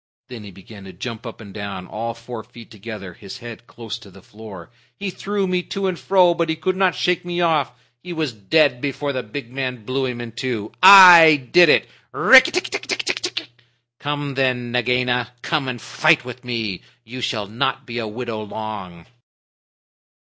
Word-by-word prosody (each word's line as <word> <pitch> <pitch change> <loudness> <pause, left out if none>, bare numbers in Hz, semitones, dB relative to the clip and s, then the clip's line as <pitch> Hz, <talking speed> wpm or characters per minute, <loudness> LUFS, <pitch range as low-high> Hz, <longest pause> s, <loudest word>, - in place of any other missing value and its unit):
Then 120 -4 -9
he 100 - -10
began 100 +2 -14
to 95 - -11
jump 115 +5 -7
up 115 - -10
and 100 -3 -12
down, 100 -3 -6
all 115 +4 -5
four 115 -1 -9
feet 120 -1 -15
together, 105 -4 -9
his 100 +7 -11
head 120 -1 -11
close 115 0 -8
to 105 - -15
the 95 0 -17
floor. 105 -4 -12 0.3
"He 200 -2 -4
threw 200 +2 -3
me 180 -1 0
to 195 +2 -5
and 185 -2 -2
fro, 185 -3 +3
but 170 -1 -2
he 160 - 0
could 185 +4 -2
not 185 -2 +1
shake 180 -1 0
me 175 0 -4
off. 160 -7 +1 0.3
He 180 - -9
was 160 -6 -3
dead 125 +5 +1
before 145 0 -3
the 130 - -2
big 120 +2 -8
man 125 -4 -5
blew 130 +2 -1
him 125 -1 -5
in 120 -1 -7
two. 115 -3 -4
I 175 -7 +9
did 175 -2 +7
it! - - +4 0.3
Rikki 260 0 +7
tikki 365 - -3
tck - - -3
tck! 360 - -3 0.5
Come 145 -1 -4
then, 125 -2 -1
Nagaina. 125 0 0
Come 150 -5 -1
and 125 -2 -4
fight 155 +1 +2
with 125 0 -9
me. 115 -6 -4 0.2
You 125 +3 -9
shall 110 -3 -2
not 115 +5 -2
be 120 0 -5
a 110 - -4
widow 115 0 -5
long." 100 -5 -8
125 Hz, 190 wpm, -20 LUFS, 110-155 Hz, 0.5 s, I